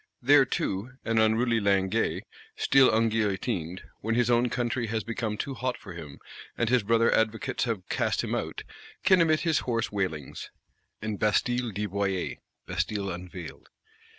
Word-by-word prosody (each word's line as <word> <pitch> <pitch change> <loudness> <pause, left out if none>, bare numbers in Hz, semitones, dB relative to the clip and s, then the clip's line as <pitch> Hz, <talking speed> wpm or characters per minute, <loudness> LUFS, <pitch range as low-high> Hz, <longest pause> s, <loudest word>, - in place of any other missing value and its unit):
There 140 +2 +6
too 105 +1 -2
an 115 -1 +2
unruly 115 +2 +3
Linguet, 100 +1 +1 0.3
still 135 -1 +5
unguillotined, 105 -5 0 0.2
when 115 +2 -1
his 120 0 +2
own 120 +1 +3
country 120 0 -1
has 110 0 -2
become 110 -1 -3
too 140 - -3
hot 130 0 -2
for 100 - -10
him, 75 -5 -9 0.4
and 120 - +1
his 125 -1 +4
brother 115 +2 +3
Advocates 110 +5 0
have 110 -6 -3
cast - - 0
him - - -3
out, - - -3 0.4
can 190 -2 +5
emit 155 -2 +3
his 165 -3 +2
hoarse 115 -2 -1
wailings, 90 -9 -3 0.5
and 110 -2 -3
Bastille 120 +3 +1
Dévoilée 100 -2 -2 0.3
(Bastille 95 +2 -2
unveiled). 90 -1 -8
110 Hz, 150 wpm, -28 LUFS, 100-120 Hz, 0.5 s, There